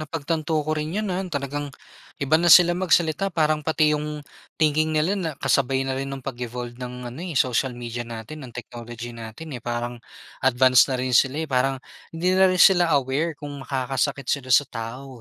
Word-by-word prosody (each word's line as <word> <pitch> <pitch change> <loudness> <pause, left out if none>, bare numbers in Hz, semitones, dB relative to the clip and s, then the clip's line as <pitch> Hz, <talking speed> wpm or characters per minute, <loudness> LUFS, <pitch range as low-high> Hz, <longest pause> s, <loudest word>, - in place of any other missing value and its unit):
napagtanto 155 0 -2
ko 155 - -1
rin 155 0 -3
yun, 215 0 -1
ah, 185 +1 -1
talagang 145 -1 -3 0.5
iba 140 +2 0
na 175 - +3
sila 175 +1 +8
magsalita 175 0 +1
parang 155 -3 +1
pati 155 0 +2
yung 150 0 -4 0.3
thinking 155 0 +2
nila 155 +5 +2
na 170 -4 -2
kasabay 135 0 +1
na 135 - -1
rin 135 +1 -3
ng 135 -2 -7
pag 135 -3 -5
evolved 120 0 -5
ng 125 0 -7
ano 125 +6 -9
eh 175 -5 -5
social 130 0 +1
media 120 0 -5
natin, 115 +6 -8
ng 120 - -13
technology 120 0 -8
natin 115 +7 -9
eh, 120 - -7
parang 120 0 -4 0.4
advance 130 0 +5
na 130 - 0
rin 130 0 -2
sila 135 +5 +3
eh - - -10
parang 135 +1 +1 0.4
hindi 180 +3 +1
na 190 0 +5
rin 185 - -1
sila 175 -2 +6
aware 140 +4 -1
kung 145 -1 -7
makakasakit 135 0 -2
sila 130 -1 -2
sa 130 +4 +6
tao 125 +3 -8
140 Hz, 195 wpm, -24 LUFS, 125-155 Hz, 0.5 s, sila